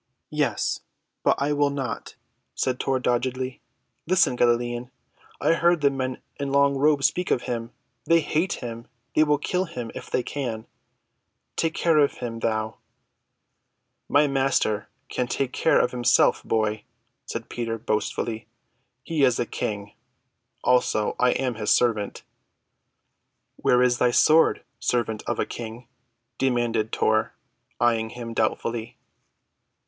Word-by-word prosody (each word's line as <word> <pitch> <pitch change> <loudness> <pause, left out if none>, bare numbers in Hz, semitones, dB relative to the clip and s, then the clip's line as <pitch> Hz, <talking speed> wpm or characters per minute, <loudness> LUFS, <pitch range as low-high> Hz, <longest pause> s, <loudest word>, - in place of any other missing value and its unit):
"Yes, - - 0 0.4
but - - +3
I 145 +1 +1
will 145 0 +2
not," 135 -4 -4 0.4
said 130 -1 -1
Tor 135 -1 0
doggedly. 130 +1 -1 0.5
"Listen, 185 -7 +3
Galilean. 120 0 +1 0.5
I - - +3
heard 170 0 +3
the 140 -1 +4
men 130 -1 -3 0.2
in 140 -1 -2
long 140 0 +4
robes 140 0 +3
speak 180 +7 +1
of 120 - +1
him. 115 -1 -4 0.3
They 165 0 +5
hate 160 +4 0
him. 115 -1 -7 0.3
They 155 - +5
will 150 -1 +3
kill 180 +5 -1
him, 120 -8 -6
if - - -8
they 125 - 0
can. 120 -6 -4 0.9
Take 165 0 0
care 165 -3 +3
of 145 - +4
him—thou." 115 -2 -3 1.3
"My 145 +1 +5
Master 135 -6 +1 0.2
can 125 - -2
take 130 +1 -2
care 160 - +3
of - - +2
himself, 120 -1 +3
boy," 110 -1 0 0.4
said 115 0 -5
Peter 115 -1 -3
boastfully. 110 +1 -2 0.6
"He 160 -4 0
is 125 -3 +4
a 120 - +1
King; 105 -2 -4 0.7
also, 125 -4 +2
I 125 - +4
am 130 -2 -1
his 110 -1 -3
servant." 110 -4 +1 1.3
"Where 125 0 +3
is 125 -1 +2
thy 125 - +4
sword, 155 +6 +4 0.2
servant 110 -3 0
of - - -1
a - - 0
King?" 115 +1 -8 0.5
demanded 120 -4 +1
Tor, 110 0 +1 0.4
eyeing 115 -2 +2
him 115 0 -7
doubtfully. 115 +1 -1
125 Hz, 135 wpm, -25 LUFS, 115-140 Hz, 1.3 s, They